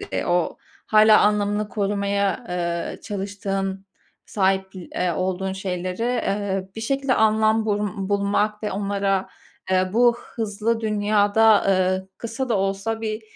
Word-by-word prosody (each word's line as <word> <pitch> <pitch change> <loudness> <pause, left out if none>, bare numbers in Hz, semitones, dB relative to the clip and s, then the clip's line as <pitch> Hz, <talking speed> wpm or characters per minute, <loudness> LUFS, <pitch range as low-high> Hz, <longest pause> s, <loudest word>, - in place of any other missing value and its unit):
de 405 - -4
o, 175 -1 +1 0.3
hâlâ 215 0 +6
anlamını 210 0 +1
korumaya, 200 +2 -1
eee, 170 -1 -3
çalıştığın, 195 -1 -4 0.4
sahipl 190 -1 0 0.2
eee, 180 -1 0
olduğun 185 +2 -2
şeyleri, 185 0 -4
eee, 200 -5 -1
bir 225 - -4
şekilde 270 +3 0
anlam 220 0 +3
bul 205 -2 -2
bulmak 205 +1 0
ve 210 - -2
onlara, 195 -1 -1 0.4
eee, 185 0 +2
bu 240 +1 +4 0.2
hızlı 225 +1 -1
dünyada, 210 0 +3
eee, 185 0 +1
kısa 235 +3 -4
da 225 - +2
olsa 195 +3 -1
bir 220 0 -3
205 Hz, 125 wpm, -23 LUFS, 190-220 Hz, 0.4 s, hâlâ